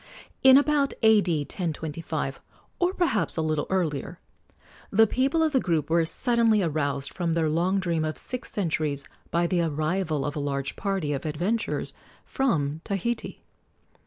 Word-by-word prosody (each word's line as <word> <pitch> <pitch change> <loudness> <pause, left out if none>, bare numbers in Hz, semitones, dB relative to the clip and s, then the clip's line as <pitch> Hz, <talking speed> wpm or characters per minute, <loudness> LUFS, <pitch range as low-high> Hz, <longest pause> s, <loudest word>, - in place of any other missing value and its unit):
In 265 0 +8
about 285 -1 +2
A.D. 200 -8 +4
1025, 160 -4 -4 0.4
or 355 0 +2
perhaps 265 - 0
a - - +1
little 155 -1 -1
earlier, 170 -7 -1 0.7
the 225 +3 +5
people 270 +8 +1
of 310 -1 +1
the 265 - +4
group 165 -7 -1
were 170 0 +4
suddenly 230 +1 +2
aroused 145 -4 -1
from 170 -3 -1
their 165 -1 +1
long 175 +5 +1
dream 170 -4 0
of 155 0 -3
six 250 0 -5
centuries 155 -7 -1 0.3
by 170 +1 +1
the 175 0 +1
arrival 155 -1 -1
of 145 +1 -3
a - - -2
large 140 -1 -2
party 190 -7 -1
of 135 - -3
adventurers 180 +9 -2 0.3
from 160 - 0
Tahiti. 220 +4 -3
170 Hz, 150 wpm, -26 LUFS, 155-220 Hz, 0.7 s, In